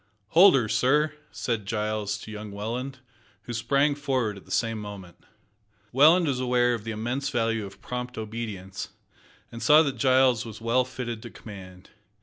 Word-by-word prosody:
"Hold 185 - +7
her, 120 -5 +2
sir," 150 +7 +2 0.2
said 110 -5 -3
Giles 105 -2 -1
to 110 - -9
young 105 0 -7
Welland, 120 +6 -4 0.5
who 120 - -6
sprang 140 +5 +2
forward 130 -7 -1
at 100 - -13
the - - -14
same 115 -2 0
moment. 100 -4 -10 0.7
Welland 160 +7 +6
was 135 -4 0
aware 125 -1 +2
of 115 -2 -5
the - - -4
immense 120 +6 -2
value 115 -5 0
of 100 - -15
prompt 125 0 -5
obedience, 105 -4 -5 0.6
and 115 - -8
saw 155 +1 +7
that 140 -3 -2
Giles 130 -3 +4
was 110 -2 -9
well 115 +3 +2
fitted 125 -3 -5
to 120 - -8
command. 95 -5 -12
120 Hz, 165 wpm, -26 LUFS, 105-130 Hz, 0.7 s, Hold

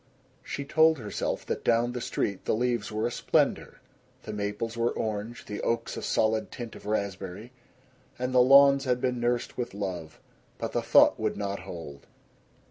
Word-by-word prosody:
She 140 - -5
told 160 +2 +4
herself 105 -5 -3
that - - -3
down 120 +1 +2
the 125 0 -5
street 100 -4 -2
the - - +1
leaves 120 -3 -1
were 110 +1 -1
a 120 - -1
splendor. - - 0 0.4
The 110 - -6
maples 105 +3 -3
were 115 0 +1
orange; 110 +2 -4
the 105 - -5
oaks 115 - -1
a - - -5
solid 110 0 +1
tint 120 -3 -7
of - - -11
raspberry. 100 +1 -3 0.7
And 125 +1 -2
the 125 - +6
lawns 140 +1 +7
had 125 -1 +1
been 125 -1 -1
nursed 120 +1 -1
with 120 -5 -3
love. 90 -6 -5 0.4
But - - -4
the - - 0
thought - - +5
would - - -1
not 100 -1 -3
hold. 70 -5 -9
115 Hz, 175 wpm, -28 LUFS, 105-125 Hz, 0.7 s, lawns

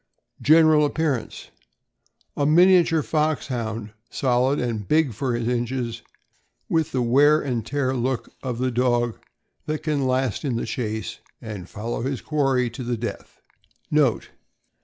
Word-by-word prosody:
General 155 0 +6
appearance. 145 -4 -2 0.4
— - - -45
A 145 - -1
miniature 170 -1 +5
Foxhound, 120 -9 -2 0.2
solid 130 +2 +1
and 115 -4 -3
big 155 -5 +2
for 125 +3 -2
his 120 -1 -2
inches, 120 -1 -2 0.7
with 160 -1 0
the 130 -2 0
wear 145 +6 +5
and 125 -6 -2
tear 135 0 -1
look 125 0 -2
of 125 -3 -3
the 130 +1 0
dog 120 -1 +1 0.5
that 155 0 -3
can 145 -4 0
last 130 -4 0
in 135 -5 -1
the 115 - -2
chase 110 -1 -4 0.2
and 105 -5 -8
follow 110 +2 -4
his 135 +1 -2
quarry 135 -5 +1
to 120 +2 -7
the 120 0 -2
death. 115 +2 -7 0.5
NOTE. 145 -6 +2
130 Hz, 140 wpm, -23 LUFS, 120-150 Hz, 0.7 s, General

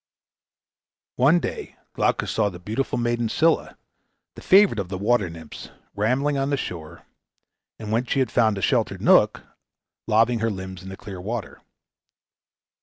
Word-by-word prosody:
One 145 +7 +5
day - - -6 0.2
Glaucus - - 0
saw 105 -2 +1
the 90 - -10
beautiful 110 +9 -3
maiden 120 -1 0
Scylla, 160 +7 +1 0.6
the - - -12
favorite 195 - +5
of 95 -3 -4
the 95 - -4
water 105 -1 +1
nymphs, 80 -2 -10 0.3
rambling 130 +7 0
on 135 +1 -1
the 140 - 0
shore, 85 -7 -7 0.7
and 110 -1 -7
when 115 +3 +1
she 130 - -2
had 130 -2 +1
found 110 -4 +2
a 95 - -4
sheltered - - 0
nook, - - +4 0.6
laving 115 +2 +3
her 115 +1 0
limbs 95 -2 -7
in 95 - -10
the 95 - -8
clear 95 -4 -9
water. 110 +3 -5
110 Hz, 155 wpm, -23 LUFS, 95-125 Hz, 0.7 s, One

